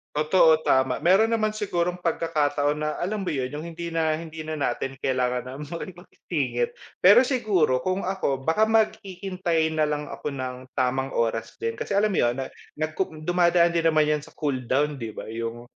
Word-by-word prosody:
Totoo 155 Hz, +1 st, +4 dB
tama. 130 Hz, 0 st, +3 dB
Meron 195 Hz, +8 st, +4 dB
naman 215 Hz, -1 st, +1 dB
sigurong 180 Hz, -4 st, -1 dB
pagkakataon 150 Hz, -3 st, +1 dB
na, 150 Hz, -, 0 dB
alam 200 Hz, +2 st, -2 dB
mo -, -, -2 dB
'yun 130 Hz, -3 st, -1 dB
'yung 145 Hz, +3 st, -6 dB
hindi 170 Hz, 0 st, -6 dB
na 160 Hz, -1 st, +2 dB
hindi 160 Hz, -1 st, -7 dB
na 155 Hz, 0 st, -5 dB
natin 135 Hz, -1 st, -2 dB
kailangan 125 Hz, -2 st, 0 dB
na 130 Hz, -, -7 dB
makipagsingit. 150 Hz, -5 st, -4 dB, 0.2 s
Pero 205 Hz, +7 st, +7 dB
siguro 200 Hz, -, +2 dB
kung 185 Hz, +8 st, -1 dB
ako 160 Hz, -8 st, -1 dB
baka 210 Hz, +9 st, +3 dB
maghihintay 190 Hz, -7 st, 0 dB
na 155 Hz, -1 st, +1 dB
lang 150 Hz, 0 st, -3 dB
ako -, -, -6 dB
ng 130 Hz, -1 st, -4 dB, 0.2 s
tamang 130 Hz, 0 st, 0 dB
oras 115 Hz, -1 st, -1 dB
din, 115 Hz, 0 st, -2 dB
kasi 200 Hz, -, -2 dB
alam 210 Hz, +1 st, +3 dB
mo 190 Hz, -, 0 dB
'yun 120 Hz, 0 st, +2 dB
na 135 Hz, -1 st, -5 dB, 0.2 s
nagku 155 Hz, +1 st, -3 dB
dumadaan 175 Hz, 0 st, +3 dB
din 165 Hz, -1 st, +2 dB
naman 155 Hz, -1 st, +4 dB
'yan 150 Hz, 0 st, +1 dB
sa -, -, -15 dB
cool 145 Hz, -4 st, -1 dB
down, 145 Hz, +1 st, +1 dB
'di 115 Hz, -3 st, -6 dB
ba, -, -, -7 dB
'yung 115 Hz, +1 st, -5 dB
155 Hz, 185 wpm, -25 LUFS, 135-180 Hz, 0.2 s, Pero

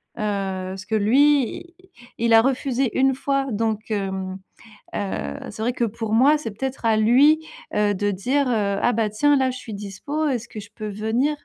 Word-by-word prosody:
parce 195 Hz, -2 st, -3 dB
que 220 Hz, -, -1 dB
lui 265 Hz, +5 st, +3 dB
il 345 Hz, 0 st, -16 dB, 0.4 s
il 230 Hz, 0 st, +2 dB
a 225 Hz, -, +8 dB
refusé 265 Hz, -1 st, 0 dB
1 265 Hz, 0 st, +3 dB
fois. 275 Hz, 0 st, -1 dB
Donc 220 Hz, 0 st, -2 dB
hem, 190 Hz, -2 st, -3 dB, 0.6 s
heu, 205 Hz, +6 st, -3 dB
c'est -, -, -8 dB
vrai 240 Hz, +3 st, 0 dB
que 240 Hz, -, -2 dB
pour 225 Hz, 0 st, -4 dB
moi, 275 Hz, +7 st, +5 dB
c'est 260 Hz, -7 st, -6 dB
peut-être 260 Hz, +4 st, -5 dB
à 220 Hz, -1 st, +3 dB
lui, 280 Hz, +9 st, +4 dB, 0.3 s
heu, 210 Hz, -1 st, +2 dB
de 205 Hz, +1 st, 0 dB
dire, 260 Hz, +9 st, 0 dB
heu: 205 Hz, -5 st, 0 dB
«Ah 245 Hz, -, +2 dB
bah 220 Hz, -1 st, 0 dB
tiens 290 Hz, +8 st, +3 dB
là 265 Hz, -1 st, +2 dB
je 255 Hz, -, -7 dB
suis 230 Hz, -3 st, -9 dB
dispo, 210 Hz, +10 st, -3 dB
est-ce 240 Hz, -5 st, -2 dB
que 215 Hz, -, -8 dB
je 205 Hz, 0 st, -11 dB
peux 215 Hz, 0 st, -5 dB
venir?» 220 Hz, +8 st, 0 dB
225 Hz, 195 wpm, -23 LUFS, 205-270 Hz, 0.6 s, a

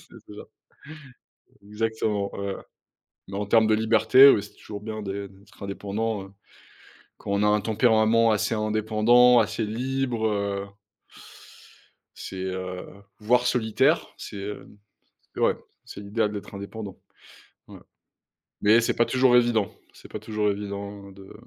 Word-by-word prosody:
C'est -, -, -16 dB, 0.2 s
ça. -, -, -9 dB, 1.3 s
Exactement, 105 Hz, -1 st, -2 dB
ouais. 100 Hz, -1 st, -4 dB, 0.7 s
Mais 100 Hz, +1 st, -6 dB
en 105 Hz, -, -2 dB
termes 110 Hz, +2 st, +4 dB
de 110 Hz, -, +4 dB
liberté, 130 Hz, +5 st, +6 dB
ouais, 105 Hz, -, +4 dB
c'est -, -, -12 dB
toujours 100 Hz, -1 st, -9 dB
bien 110 Hz, 0 st, -6 dB
d'être 100 Hz, 0 st, -8 dB
indépendant, 100 Hz, +2 st, -3 dB
hein, 95 Hz, 0 st, -14 dB, 0.9 s
quand -, -, -7 dB
on 100 Hz, +1 st, +1 dB
a 105 Hz, -, +3 dB
un 105 Hz, 0 st, +3 dB
tempérament 110 Hz, +1 st, +3 dB
assez 110 Hz, +1 st, 0 dB
indépendant, 110 Hz, +3 st, +4 dB
assez 110 Hz, +1 st, -1 dB
libre, 125 Hz, +1 st, -2 dB
heu 100 Hz, -1 st, -2 dB, 1.5 s
c'est, -, -, -8 dB
heu 95 Hz, -1 st, -5 dB, 0.3 s
voire 120 Hz, +3 st, +2 dB
solitaire, 125 Hz, +6 st, +2 dB
c'est, 105 Hz, -, -8 dB
heu, 105 Hz, +1 st, -8 dB, 0.6 s
ouais, -, -, +2 dB, 0.3 s
c'est -, -, -10 dB
l'idéal 105 Hz, +1 st, -1 dB
d'être 100 Hz, 0 st, -8 dB
indépendant. 100 Hz, 0 st, -8 dB, 0.7 s
Ouais. -, -, -12 dB, 0.8 s
Mais 110 Hz, +3 st, +5 dB
c'est 115 Hz, -, 0 dB
pas 120 Hz, -, +2 dB
toujours 130 Hz, -1 st, +3 dB
évident. 120 Hz, -4 st, +2 dB, 0.2 s
C'est -, -, -16 dB
pas 110 Hz, -, -5 dB
toujours 105 Hz, -1 st, -1 dB
évident 100 Hz, 0 st, -7 dB
de 95 Hz, 0 st, -14 dB
105 Hz, 135 wpm, -25 LUFS, 100-115 Hz, 1.5 s, liberté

